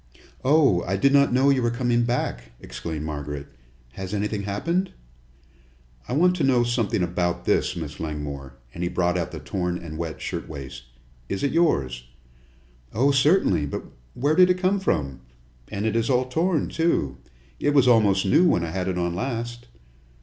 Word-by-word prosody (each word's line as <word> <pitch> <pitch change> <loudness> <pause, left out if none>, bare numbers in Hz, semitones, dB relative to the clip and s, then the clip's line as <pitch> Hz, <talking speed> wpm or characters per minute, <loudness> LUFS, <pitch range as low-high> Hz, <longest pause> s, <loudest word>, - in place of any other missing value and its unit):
"Oh, 135 - +4
I 95 +2 0
did 140 +7 +3
not 140 0 +5
know 130 +3 +4
you 135 -2 +2
were 120 - +1
coming 120 0 +1
back!" - - -3
exclaimed 75 +6 -6
Margaret. 75 -2 -5 0.5
"Has 95 +8 -5
anything 105 0 -2
happened?" 165 - -1 1.2
"I - - -3
want 180 +5 +3
to 160 - 0
know 130 -3 +4
something 120 -6 0
about 90 0 -1
this, 95 - +1
Miss 80 -4 -6
Langmore," 70 -3 -5 0.2
and 85 - -7
he 90 - 0
brought 90 -1 0
out 90 -1 -1
the - - -7
torn 90 -3 -2
and 80 -3 -8
wet 85 -2 -4
shirtwaist. 65 -4 -6 0.4
"Is 100 - -3
it 140 - +1
yours?" 65 - +1 0.9
"Oh, 135 +6 +3
certainly; 140 - +3
but - - -5 0.3
where 145 +5 +1
did 180 +2 +6
it 180 - +3
come 190 +2 +1
from? 70 - -1 0.5
And 100 +2 -4
it 110 - 0
is 115 +2 +1
all 130 -1 +2
torn, 160 +5 0
too! 160 - 0 0.4
It 145 - +1
was 135 -3 +5
almost 105 -5 +4
new 125 - +4
when 85 - +2
I 80 - -3
had 95 +1 -2
it 95 -1 -1
on 85 -1 -1
last!" 120 +3 -4
100 Hz, 175 wpm, -24 LUFS, 80-135 Hz, 1.2 s, did